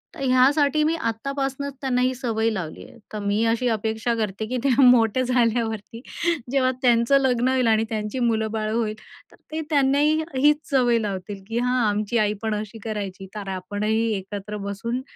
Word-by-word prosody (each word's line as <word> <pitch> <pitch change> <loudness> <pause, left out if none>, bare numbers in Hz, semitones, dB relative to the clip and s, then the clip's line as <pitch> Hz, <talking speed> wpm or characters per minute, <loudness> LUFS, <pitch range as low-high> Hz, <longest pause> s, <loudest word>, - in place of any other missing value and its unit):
तर - - -11
ह्यासाठी 280 +4 +3
मी 315 +2 +1
आत्तापासनंच 275 +2 -3
त्यांना 255 -2 +1
ही 255 +1 +2
सवय 230 -3 0
लावली 180 -8 -5
आहे. - - -17 0.2
तर 215 - -3
मी 205 +2 0
अशी 235 +2 0
अपेक्षा 220 +2 -1
करते 215 -1 -2
की 250 +3 -2
ते 280 - +2
मोठे 245 -1 +5
झाल्यावरती, 230 -3 0 0.5
जेव्हा 260 -1 +2
त्यांचं 240 +2 +4
लग्न 250 -2 +2
होईल 260 -2 +2
आणि 220 0 +3
त्यांची 215 +2 -3
मुलंबाळं 220 -2 0
होईल, 220 -2 -1 0.4
तर - - -18 0.2
ते 315 +1 -2
त्यांनाही 290 +1 +3
हीच 295 +3 +4
सवय 245 -3 +3
लावतील 200 -1 -5
की 225 +1 -3
"हां, 250 +1 +1
आमची 210 +2 0
आई 210 -2 +2
पण 220 -1 -1
अशी 215 +1 -6
करायची, 200 -3 -5
तर 200 -2 -5
आपणही 210 +4 -1
एकत्र 205 +2 -6
बसून 230 +5 -3
230 Hz, 170 wpm, -23 LUFS, 215-255 Hz, 0.5 s, मोठे